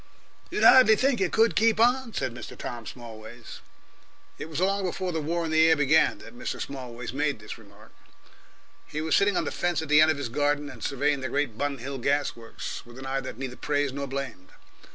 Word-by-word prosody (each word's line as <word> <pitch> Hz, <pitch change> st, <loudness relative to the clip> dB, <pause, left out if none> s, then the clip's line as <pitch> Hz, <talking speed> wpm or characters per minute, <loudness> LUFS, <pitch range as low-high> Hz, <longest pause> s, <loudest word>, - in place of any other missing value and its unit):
"You'd -, -, -1 dB
hardly 255 Hz, -4 st, +8 dB
think 255 Hz, -1 st, +1 dB
it 185 Hz, -, +1 dB
could 225 Hz, +1 st, +3 dB
keep 225 Hz, 0 st, +3 dB
on," 245 Hz, +1 st, +3 dB
said 130 Hz, -3 st, -2 dB
Mr. 120 Hz, -, -9 dB
Tom 120 Hz, -2 st, -6 dB
Smallways. 115 Hz, -1 st, -10 dB, 0.8 s
It 160 Hz, -, -6 dB
was 155 Hz, -1 st, -4 dB
along 195 Hz, +2 st, +1 dB
before 185 Hz, 0 st, -2 dB
the 160 Hz, -2 st, -2 dB
War 170 Hz, +3 st, -1 dB
in 160 Hz, -, -3 dB
the 160 Hz, +1 st, +5 dB
Air 160 Hz, -, +6 dB
began 145 Hz, +1 st, +3 dB
that -, -, -13 dB
Mr. 250 Hz, +1 st, -5 dB
Smallways 125 Hz, -4 st, -6 dB
made 145 Hz, -1 st, 0 dB
this 110 Hz, +1 st, -9 dB
remark. 105 Hz, -1 st, -18 dB, 0.9 s
He 155 Hz, -, -5 dB
was 160 Hz, 0 st, -1 dB
sitting 200 Hz, -1 st, +3 dB
on -, -, +1 dB
the -, -, -3 dB
fence 175 Hz, -3 st, -1 dB
at 160 Hz, -, -8 dB
the 150 Hz, 0 st, +7 dB
end 155 Hz, -, +6 dB
of 155 Hz, -, +1 dB
his 140 Hz, -4 st, -4 dB
garden 145 Hz, +2 st, 0 dB
and -, -, -11 dB
surveying 145 Hz, +1 st, 0 dB
the 130 Hz, -, -3 dB
great 140 Hz, -4 st, -1 dB
Bun 140 Hz, +3 st, -2 dB
Hill 135 Hz, +2 st, -6 dB
gas 140 Hz, +3 st, 0 dB
works 115 Hz, -1 st, -7 dB
with 120 Hz, +1 st, -14 dB
an 135 Hz, -, -8 dB
eye 135 Hz, 0 st, -1 dB
that -, -, -7 dB
neither 130 Hz, -1 st, -5 dB
praised 145 Hz, -1 st, -1 dB
nor 140 Hz, 0 st, -4 dB
blamed. 135 Hz, -9 st, -6 dB
145 Hz, 220 wpm, -26 LUFS, 125-165 Hz, 0.9 s, hardly